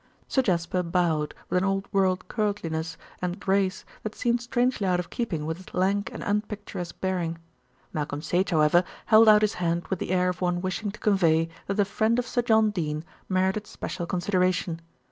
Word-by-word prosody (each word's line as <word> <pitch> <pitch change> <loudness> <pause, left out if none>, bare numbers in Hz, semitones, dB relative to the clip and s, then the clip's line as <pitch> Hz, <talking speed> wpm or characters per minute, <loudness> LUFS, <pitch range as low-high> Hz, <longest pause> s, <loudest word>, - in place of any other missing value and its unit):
Sir 265 - +2
Jasper 180 -4 0
bowed 170 -4 0
with 180 - +2
an - - 0
old 195 0 0
world 185 -2 +2
courtliness 170 -7 -2 0.2
and 180 +2 -2
grace 195 -1 0 0.2
that 215 - -5
seemed 240 0 +1
strangely 245 -3 0
out 180 -1 +2
of 175 - -5
keeping 170 -11 -2
with 160 +1 -2
his 185 - -12
lank 195 +3 +1
and - - -6
unpicturesque 205 -4 -3
bearing. 175 -3 -1 0.6
Malcolm 150 -1 -3
Sage, 180 +4 +1
however, 160 +2 +4 0.2
held 220 0 +7
out 210 0 +7
his 210 - +2
hand 170 0 0
with 190 - -1
the - - -4
air 180 0 +2
of 180 - -4
one 175 -1 +1
wishing 185 +3 -2
to 205 - -9
convey 165 -5 +3 0.2
that 200 +1 -2
a 205 - +5
friend 220 +3 +1
of 245 - 0
Sir 245 - 0
John 220 -2 +4
Dene 155 -5 -2 0.3
merited 190 +2 +1
special 170 -3 -5
consideration. 180 -2 0
185 Hz, 185 wpm, -26 LUFS, 170-210 Hz, 0.6 s, held